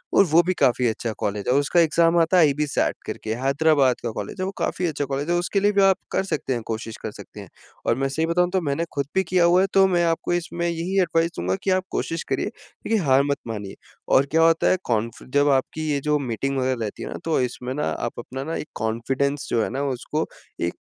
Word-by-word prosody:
और - - +7
वो 165 0 +5
भी 185 - 0
काफ़ी 125 -2 +3
अच्छा 115 0 -2
कॉलेज 100 0 -2
है, 125 - +3
औ 140 - +4
उसका 145 +5 +2
एग्ज़ाम 165 +1 +3
आता 165 +3 +3
है 170 - +7
आईबीसैट 145 0 0
करके, 110 - -4
हैदराबाद 135 0 +3
का 120 - -1
कॉलेज 105 - -6
है। 185 - -1
वो 195 - -3
काफ़ी 180 - -1
अच्छा 145 -2 -2
कॉलेज 140 +3 -3
है, 175 - +2
उसके 180 +3 0
लिए 205 +1 +3
भी 200 -1 +3
आप 190 -1 +5
कर - - +1
सकते 150 -7 -2
हैं 120 - -2
कोशिश 110 0 -5
कर - - -3
सकते - - -12
हैं, - - -10 0.4
और 115 - +2
मैं 135 +1 0
सही 160 +4 0
बताऊँ 175 +2 +2
तो 190 - +2
मैंने 155 +2 -1
खुद 140 -1 -1
भी 190 - +3
किया 175 0 +2
हुआ 180 +2 +5
है 195 - +2
तो 195 0 +6
मैं 175 -2 +2
आपको 165 +1 0
इसमें 170 0 -2
यही 170 +3 -1
एडवाइस 165 -1 +1
दूँगा 90 +2 0
कि - - 0
आप 185 0 +2
कोशिश 165 +1 -2
करिए। - - 0
देखिए, 225 - -4
हार 135 0 +5
मत 140 - +1
मानिए 105 -3 -5 0.4
और 135 - +5
क्या 160 - +3
होता 165 0 +4
है 185 - +3
कॉन्फि 115 -1 -2
जब 145 0 +4
आपकी 155 +3 0
ये 140 - +1
जो 150 0 +2
मीटिंग 135 +2 -2
वगैरह 130 0 +1
रहती 105 - -4
है - - -5
ना, - - -5
तो 165 - +1
इसमें 125 +1 -3
ना 150 - -2
आप 80 - -3
अपना 130 +1 -6
ना 160 +2 -4
एक - - -5
कॉन्फिडेंस 135 +6 -1
जो 115 -2 +2
है - - -2
ना, 135 +3 -3
उसको 140 +3 -2 0.4
एक 85 0 0
145 Hz, 250 wpm, -23 LUFS, 130-170 Hz, 0.4 s, और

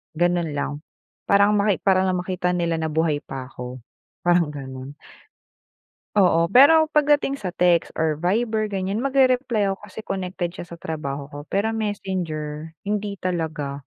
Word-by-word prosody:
Gano'n 175 -2 +1
lang, 145 +1 -3 0.5
parang 200 +1 +5
maki 205 -1 +1
para 190 -1 +3
lang 185 - +1
makita 180 0 -1
nila 170 -2 0
na 160 - -1
buhay 155 -1 +1
pa 135 -3 -7
ako, 125 -1 -8 0.4
parang 175 -2 +3
gano'n. 130 +1 -8 1.2
Oo, 170 -4 +4
pero 290 - +7
pagdating 290 -2 +3
sa 195 -9 -4
text 175 -1 +2
or 160 -1 +2
Viber 215 +6 0
ganyan 195 +4 -2
magrereply 255 -5 +2
ako 195 +1 -3
kasi 210 +1 -12
connected 180 -2 -3
siya - - -6
sa 170 - -9
trabaho 140 -4 -4
ko, 145 0 -10
pero 220 +3 0
Messenger 165 -8 -3 0.2
hindi 205 -1 -2
talaga. 155 -6 -3
180 Hz, 145 wpm, -23 LUFS, 155-205 Hz, 1.2 s, pero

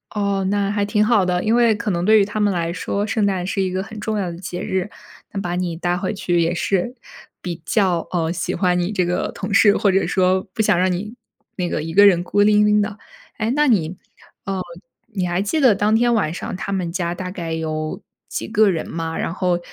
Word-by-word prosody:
哦， 200 -2 0
那 200 0 0
还 205 -1 0
挺 210 0 +2
好 215 -4 +3
的， 180 0 0
因 220 +1 +2
为 235 -2 +4
可 205 0 -2
能 175 -1 -1
对 215 +1 +6
于 200 - +3
他 210 +1 -4
们 205 -2 +2
来 170 -1 -1
说， 200 +3 -2
圣 215 -1 0
诞 190 -3 0
是 195 +1 -1
一 190 - 0
个 185 +1 -2
很 220 +1 -9
重 215 0 -2
要 185 -4 -2
的 170 - -8
节 180 0 -6
日， 190 +1 -2 0.4
嗯， 195 - -2
把 175 -2 -3
你 180 -2 -2
带 175 +1 -1
回 190 +2 -2
去 175 -3 0
也 170 +1 +1
是 195 +7 -1 0.5
比 170 -2 -5
较， 185 -3 +1
呃， 165 -2 0
喜 175 -2 -2
欢 180 -2 +1
你 175 +3 -1
这 185 -3 +1
个 175 +1 -1
同 195 +1 -5
事， 205 0 +6
或 200 - +2
者 195 +1 +1
说 185 0 +2
不 - - 0
想 210 - +3
让 185 +1 +2
你 210 +6 -4 0.4
那 180 -2 -1
个 150 - -2
一 165 +1 -5
个 200 +3 +7
人 175 -3 +3
孤 205 +3 +1
零 210 0 +5
零 210 0 +4
的。 205 0 -3 0.4
哎， 220 +1 -1
那 295 +1 +3
你 185 - +1 0.5
呃， 195 -1 -2 0.5
你 185 -3 -1
还 175 +2 0
记 210 +10 -1
得 255 -8 +5
当 205 +2 +1
天 235 +1 +3
晚 165 -8 +1
上 180 - -5
他 195 - -5
们 185 -3 -1
家 175 -1 -2
大 185 +1 -5
概 175 -3 -5
有 155 -1 -3 0.3
几 115 - -4
个 210 - +3
人 165 -4 -2
吗？ 165 0 -4
然 - - -2
后 180 -1 0
190 Hz, 260 characters per minute, -21 LUFS, 175-210 Hz, 0.5 s, 个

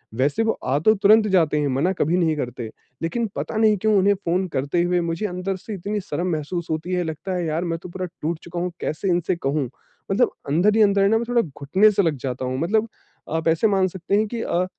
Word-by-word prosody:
वैसे 140 - +1
वो 225 - +2
अ, 140 +3 -1
तो 215 +7 +5
तुरंत 215 +2 +5
जाते 165 -6 +3
हैं, 145 - +1
मना 140 +8 +1
कभी 170 +1 +1
नहीं 160 -3 +2
करते। 120 -4 -4 0.3
लेकिन 200 +8 -1
पता - - -4
नहीं 215 -2 +4
क्यों 215 +3 +1
उन्हें 200 +2 +4
फ़ोन 180 +2 +1
करते 145 +3 -1
हुए 175 0 +1
मुझे 170 +5 -2
अंदर 185 +1 -3
से 215 +3 -8
इतनी 205 +3 -3
शर्म 175 +1 -3
महसूस 165 +3 -3
होती 160 +3 -3
है, 180 -1 +1
लगता 165 +4 -4
है 175 -2 -1
"यार 160 +2 -1
मैं 165 -1 -2
तो 180 - -10
पूरा 185 +1 -4 0.2
टूट 160 +1 -2
चूका 170 0 -5
हूँ। 180 0 -2
कैसे 185 +5 -2
इनसे 175 +1 +1
कहूँ?" 140 -4 -1 0.4
मतलब 235 +6 +3 0.2
अंदर 190 +8 +3
ही 220 - +4
अंदर 200 -1 +4
है 195 - +5
ना 225 - +4
मैं 235 - -2
थोड़ा 240 -1 +3
घुटने 175 +7 +2
से 200 - +2
लग 160 -3 +1
जाता 130 -1 -3
हूँ। 130 +1 -2
मतलब 215 +7 +1 0.5
आप 160 0 -1
ऐसे 165 +7 +3
मान 190 -2 +2
सकते 185 +2 -2
हैं 215 +1 +2
कि 230 +1 -4
अ, 180 +1 0
180 Hz, 245 wpm, -23 LUFS, 155-200 Hz, 0.5 s, तो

